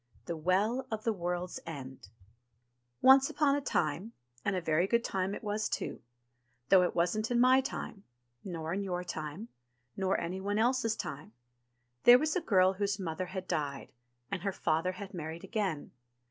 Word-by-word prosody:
THE 170 - -3
WELL 200 +10 +1
OF 220 -2 -4
THE 225 - +1
WORLD'S 180 -1 -3
END 130 - -8 0.9
ONCE 265 +1 +7
Upon 290 -2 +2
a 285 - -1
time, 170 - -1 0.3
and 195 - 0
a - - +1
very 165 +1 +1
good 235 +2 +2
time 190 -1 -1
it - - -9
was, 210 0 -1 1.0
though 190 -1 +7
it 180 - 0
wasn't 195 +6 +1
in 240 -1 +2
my 255 +2 +6
time, 210 -6 -6 0.4
nor 165 -3 -4
in 200 - -1
your 180 -2 -2
time, 160 +6 -6 0.5
nor 190 0 0
anyone 190 +4 -2
else's 230 0 +2
time, 140 -6 -6 0.7
there 240 +1 +10
was 310 +3 0
a 365 - +1
girl 190 - +4
whose 200 +1 -1
mother 180 0 -3
had 185 0 -6
died, 140 -3 -3 0.4
and 190 - -2
her 200 +1 -1
father 175 0 0
had 200 +1 -8
married 165 -1 -6
again. 195 -9 -2
190 Hz, 165 wpm, -31 LUFS, 170-220 Hz, 1.0 s, there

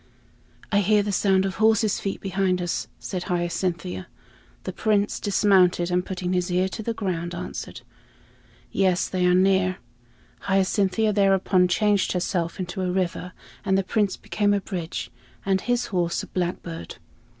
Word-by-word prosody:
"I 205 - +4
hear 205 +1 +3
the 205 - -2
sound 195 -1 +2
of 190 -1 -3
horses' 220 -1 +3
feet 195 - -4
behind 190 -1 0
us," 175 -1 -2
said 180 -3 -5
Hyacinthia. 175 - -2 0.6
The 185 - -5
Prince 205 +1 +1
dismounted, 185 -4 +3
and 180 0 +2
putting 185 -1 -3
his 180 0 0
ear 180 +1 +2
to 220 - -6
the 230 +1 -3
ground, 175 -4 -3
answered, - - -6 0.9
"Yes, 185 -2 +2
they 180 -1 +1
are 180 - +4
near." 185 0 +3 0.7
Hyacinthia 195 +2 +2
thereupon 195 -2 +3
changed 205 +2 +2
herself 175 -1 -1
into 185 +1 -4
a 185 - 0
river, 180 -1 -2 0.3
and 190 0 +2
the 195 - +1
Prince 205 0 0
became 205 -1 0
a - - +1
bridge, 180 -3 -5 0.3
and 190 -1 +2
his 245 0 0
horse 175 -2 0
a - - -5
blackbird. 175 - -4
185 Hz, 150 wpm, -24 LUFS, 180-200 Hz, 0.9 s, I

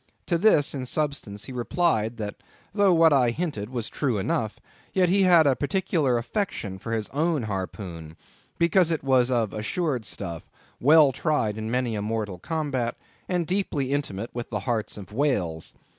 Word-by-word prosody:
To 170 -2 +1
this, 170 -8 +4
in 130 -3 -4
substance, 130 -9 -3
he - - -8
replied, 120 -3 0
that 105 -2 -5 0.4
though 200 -2 +4
what 165 -2 +6
I 125 -4 +4
hinted 115 -6 -3
was 120 -3 -3
true 130 -7 -1
enough, 105 +2 -1 0.3
yet 185 -2 +3
he 195 +2 +3
had 175 -4 +6
a 135 -2 +4
particular 150 -4 +1
affection 115 - -3
for 115 - -6
his 110 -2 -1
own 155 -1 0
harpoon, 95 -5 -5 0.4
because 170 +1 +3
it 160 -4 -1
was 130 -2 +3
of 115 -6 0
assured 125 +4 -2
stuff, 85 -6 -6 0.3
well 150 +1 +6
tried 130 -7 0
in 110 0 -4
many 125 -1 0
a 105 - -2
mortal 105 -3 -3
combat, 145 - -2 0.3
and 180 -2 +1
deeply 155 -7 -1
intimate 115 -6 -3
with 120 -1 -5
the 105 -3 -3
hearts 110 0 -1
of 100 0 -10
whales. 100 - -1
125 Hz, 170 wpm, -26 LUFS, 110-160 Hz, 0.4 s, what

